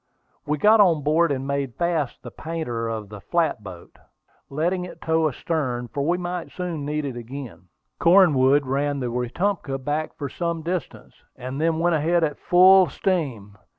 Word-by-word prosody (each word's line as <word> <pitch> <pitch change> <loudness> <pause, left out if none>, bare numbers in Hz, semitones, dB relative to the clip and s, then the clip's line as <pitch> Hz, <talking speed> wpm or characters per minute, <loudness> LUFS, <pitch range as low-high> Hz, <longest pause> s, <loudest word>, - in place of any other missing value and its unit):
We 150 +1 0
got 215 +6 +5
on 165 -7 +3
board 155 +2 +2
and 135 -1 -2
made 140 -3 -2
fast 170 -6 -2
the 120 - -8
painter 140 -9 -4
of 110 -3 -5
the 105 -1 -10
flat 165 - 0
boat, 90 -4 -12 0.5
letting 175 +6 -1
it 180 - -9
tow 160 0 +1
astern, 130 -4 -3
for 140 - -3
we 170 +4 +1
might 180 0 -5
soon 175 -5 -4
need 150 0 -2
it 135 -3 -4
again. 120 -4 -8 0.3
Cornwood 145 -6 +5
ran 140 +2 -1
the 125 -2 -3
Wetumpka 135 +5 -2
back 145 +4 -3
for 140 - -4
some 170 +3 -3
distance, 175 0 -5 0.2
and 130 +3 -6
then 165 0 +1
went 170 +1 +2
ahead 165 +3 +1
at 150 -2 -1
full 185 0 +6
steam. 130 - -2
150 Hz, 170 wpm, -23 LUFS, 130-170 Hz, 0.5 s, full